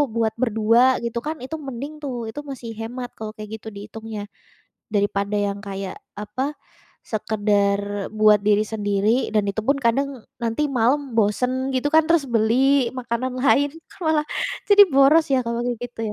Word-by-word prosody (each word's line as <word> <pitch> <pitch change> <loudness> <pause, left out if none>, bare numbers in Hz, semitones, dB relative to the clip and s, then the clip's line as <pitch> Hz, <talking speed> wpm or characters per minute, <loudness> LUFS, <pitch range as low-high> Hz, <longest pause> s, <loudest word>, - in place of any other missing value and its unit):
buat 225 -1 +1
berdua 230 +2 +4
gitu 235 0 -3
kan, 310 +2 -3
itu 265 +5 -5
mending 280 +2 -7
tuh, 240 -5 -4
itu 290 - -7
masih 255 -4 -7
hemat 245 +2 -5
kalau 220 -1 -5
kayak 215 +1 -7
gitu 220 - -13
dihitungnya, 215 +1 -7 0.7
daripada 200 0 0
yang 200 -1 -1
kayak 195 -2 -6 0.2
apa 210 +5 -4 0.6
sekadar 205 -2 0
buat 215 -1 +5
diri 210 0 +4
sendiri. 210 +2 0
Dan 210 -2 +3
itupun 225 +7 0
kadang 265 +1 0 0.2
nanti 230 +6 0
malam 265 +4 +1
bosen 250 +5 +1
gitu 260 +3 +1
kan, 320 0 +6
terus 330 -3 +3
beli 240 +4 +3
makanan 250 +1 -3
lain, 285 +1 +4 0.2
kan - - -18
malah 305 -1 +2 0.4
jadi 405 0 +9
boros 280 +4 +5
ya 265 - +4
kalau 235 0 -1
kayak 245 -1 -1
gitu 245 -1 -8
230 Hz, 155 wpm, -22 LUFS, 210-265 Hz, 0.7 s, jadi